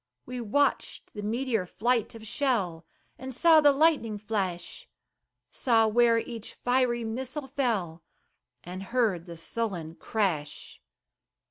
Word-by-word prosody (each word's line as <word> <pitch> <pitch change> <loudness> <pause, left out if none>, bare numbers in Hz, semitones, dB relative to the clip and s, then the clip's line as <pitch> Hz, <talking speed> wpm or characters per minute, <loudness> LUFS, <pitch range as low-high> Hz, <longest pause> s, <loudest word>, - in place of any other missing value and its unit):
We 250 0 -5
watched 280 +6 0
the 210 - -6
meteor 225 -2 -1
flight 235 +3 0
of 225 -1 -10
shell, 195 - -1 0.3
And 260 +1 -6
saw 320 +2 +6
the 290 -1 +7
lightning 280 -7 +2
flash; 195 -5 -3 0.6
Saw 225 -3 +3
where 230 +1 +4
each 230 -1 -5
fiery 245 -1 +1
missile 260 +6 -4
fell, 215 - -1 0.6
And 180 +2 -7
heard 195 -5 0
the 170 -1 -8
sullen 175 -3 -3
crash. 165 -7 -3
225 Hz, 120 wpm, -28 LUFS, 190-250 Hz, 0.6 s, the